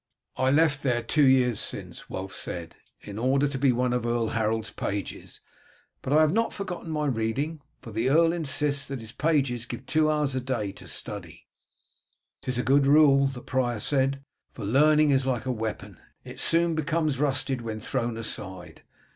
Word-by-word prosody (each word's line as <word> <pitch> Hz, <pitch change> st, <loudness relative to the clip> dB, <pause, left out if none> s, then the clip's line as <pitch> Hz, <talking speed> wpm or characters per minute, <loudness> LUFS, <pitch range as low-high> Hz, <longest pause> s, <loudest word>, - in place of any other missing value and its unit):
"I 130 Hz, -, +1 dB
left 145 Hz, 0 st, +3 dB
there 120 Hz, -4 st, 0 dB
two 145 Hz, +5 st, +3 dB
years 125 Hz, -4 st, +3 dB
since," -, -, -6 dB
Wulf 95 Hz, 0 st, -6 dB
said, 85 Hz, -2 st, -5 dB, 0.3 s
"in 105 Hz, 0 st, -7 dB
order 135 Hz, +4 st, +2 dB
to 140 Hz, -1 st, -4 dB
be 135 Hz, -1 st, +4 dB
one 125 Hz, 0 st, 0 dB
of 125 Hz, -1 st, 0 dB
Earl 120 Hz, -1 st, 0 dB
Harold's 110 Hz, -1 st, -1 dB
pages; 100 Hz, 0 st, -5 dB, 0.6 s
but 130 Hz, -, -4 dB
I 155 Hz, +2 st, +6 dB
have 155 Hz, +1 st, +3 dB
not 230 Hz, +2 st, +1 dB
forgotten 180 Hz, -4 st, -5 dB
my 150 Hz, -1 st, -1 dB
reading, 135 Hz, +5 st, -1 dB, 0.2 s
for 115 Hz, -, -9 dB
the 115 Hz, +4 st, 0 dB
earl 165 Hz, +3 st, +4 dB
insists 145 Hz, -3 st, 0 dB
that 135 Hz, -2 st, -5 dB
his 110 Hz, -1 st, -10 dB
pages 135 Hz, -5 st, 0 dB
give 125 Hz, +2 st, -7 dB
two 155 Hz, +2 st, +2 dB
hours 150 Hz, -3 st, +1 dB
a 130 Hz, -, -1 dB
day 120 Hz, -6 st, -2 dB
to -, -, -12 dB
study." -, -, -6 dB, 1.0 s
"Tis 130 Hz, -1 st, -2 dB
a 125 Hz, -, 0 dB
good 135 Hz, +1 st, +4 dB
rule," 140 Hz, -2 st, +6 dB
the 135 Hz, -3 st, -7 dB
prior 120 Hz, -3 st, -1 dB
said, 135 Hz, +2 st, 0 dB, 0.3 s
"for -, -, -7 dB
learning 150 Hz, +6 st, +4 dB
is 135 Hz, -1 st, +2 dB
like 125 Hz, -3 st, -1 dB
a 130 Hz, -, 0 dB
weapon, 110 Hz, -2 st, -5 dB, 0.2 s
it -, -, -10 dB
soon 170 Hz, 0 st, +3 dB
becomes 155 Hz, -3 st, 0 dB
rusted 135 Hz, -3 st, 0 dB
when 110 Hz, -2 st, -5 dB
thrown 120 Hz, 0 st, -2 dB
aside. 95 Hz, -4 st, -7 dB
130 Hz, 180 wpm, -26 LUFS, 115-150 Hz, 1.0 s, I